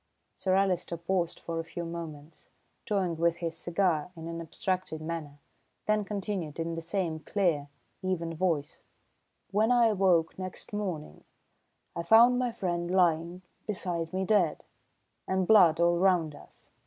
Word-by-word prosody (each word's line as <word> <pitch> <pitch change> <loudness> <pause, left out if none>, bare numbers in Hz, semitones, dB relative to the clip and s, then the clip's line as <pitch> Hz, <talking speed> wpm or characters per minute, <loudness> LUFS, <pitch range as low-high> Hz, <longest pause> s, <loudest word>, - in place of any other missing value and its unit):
Sir 185 -1 +1
Alister 185 -3 +1
paused 170 0 -1
for 165 -1 -4
a - - -2
few 170 +1 -6
moments, 160 -2 -8 0.4
toying 185 -5 0
with 170 0 +2
his 170 -1 -4
cigar 170 -2 0
in 165 0 -8
an 165 0 -5
abstracted 180 0 -2
manner, 155 -2 -5 0.5
then 215 0 +2
continued 195 -6 -4
in 165 0 -2
the 165 - -4
same 165 -2 -2
clear, 160 -5 0 0.3
even 175 -3 -2
voice: 160 -4 -1 0.7
"When 215 +4 +3
I 240 -2 +5
awoke 185 -5 +2
next 185 +2 -6
morning, 180 - -4 0.7
I 170 - -2
found 235 +7 +6
my 250 -1 0
friend 175 -4 -2
lying 175 -1 +1 0.2
beside 175 -5 -2
me 190 +1 -1
dead, 185 -6 +2 0.6
and 190 0 +1
blood 175 -6 +6
all 170 0 +3
round 175 -5 +3
us! - - -16
175 Hz, 145 wpm, -29 LUFS, 165-190 Hz, 0.7 s, found